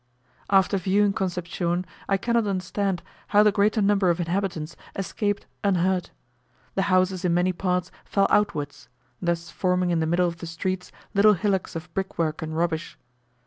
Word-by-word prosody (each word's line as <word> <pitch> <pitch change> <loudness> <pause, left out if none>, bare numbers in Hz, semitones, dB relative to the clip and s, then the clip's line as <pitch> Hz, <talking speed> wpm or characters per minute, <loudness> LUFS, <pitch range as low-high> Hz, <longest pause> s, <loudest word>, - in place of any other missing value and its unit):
After 195 0 +4
viewing 195 +2 +2
Concepcion, 180 -1 -2 0.2
I 195 - +3
cannot 235 +2 +1
understand 190 0 -1 0.2
how 210 0 +5
the 210 - +5
greater 210 +1 +2
number 195 -2 +3
of 170 0 +1
inhabitants 170 -2 -2 0.2
escaped 205 +1 -2 0.2
unhurt. 185 -2 +1 0.6
The 195 - +1
houses 185 0 +2
in 175 -2 +2
many 180 +1 +2
parts 180 0 -1
fell 195 -1 +2
outwards; 155 -9 0 0.3
thus 170 -1 -1
forming 180 -1 +1
in 170 - +2
the 160 - 0
middle 175 +2 +2
of 170 -1 -4
the 170 - -7
streets 180 +2 -3 0.2
little 210 +1 +6
hillocks 190 -1 -1
of 165 0 -7
brickwork 170 -5 -2
and 160 0 -4
rubbish. 165 -1 -1
185 Hz, 155 wpm, -25 LUFS, 170-195 Hz, 0.6 s, little